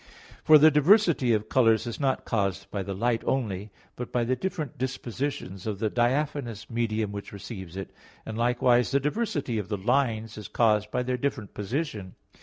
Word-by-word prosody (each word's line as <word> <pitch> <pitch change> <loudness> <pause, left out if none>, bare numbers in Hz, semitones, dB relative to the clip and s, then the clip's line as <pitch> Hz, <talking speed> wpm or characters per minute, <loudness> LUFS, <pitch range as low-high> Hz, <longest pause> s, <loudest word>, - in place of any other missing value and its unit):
For 155 - +8
the 155 +2 +7
diversity 155 - +4
of 110 -1 +1
colors 115 -3 +3
is 120 - -5
not 135 -2 0
caused 100 -3 -1
by 100 - -2
the 95 0 -4
light 115 +3 +1
only, 105 -6 -2 0.3
but 125 - -6
by 120 - +1
the 125 +2 +1
different 155 0 -4
disposition 125 -5 -3
of 105 -2 -2
the 110 +1 -1
diaphanous 125 -2 -1
medium 110 -2 -1
which 100 0 -7
receives 95 -3 -8
it; 95 - -6 0.3
and 110 - -5
likewise, 120 +1 +3
the 140 +2 +2
diversity 145 - -1
of 105 - -6
the 105 - -1
lines 115 -1 0
is 105 - -7
caused 105 -1 +2
by 125 - -1
their 125 0 -1
different 120 -6 -3
position. 105 - -4
115 Hz, 180 wpm, -27 LUFS, 105-135 Hz, 0.3 s, For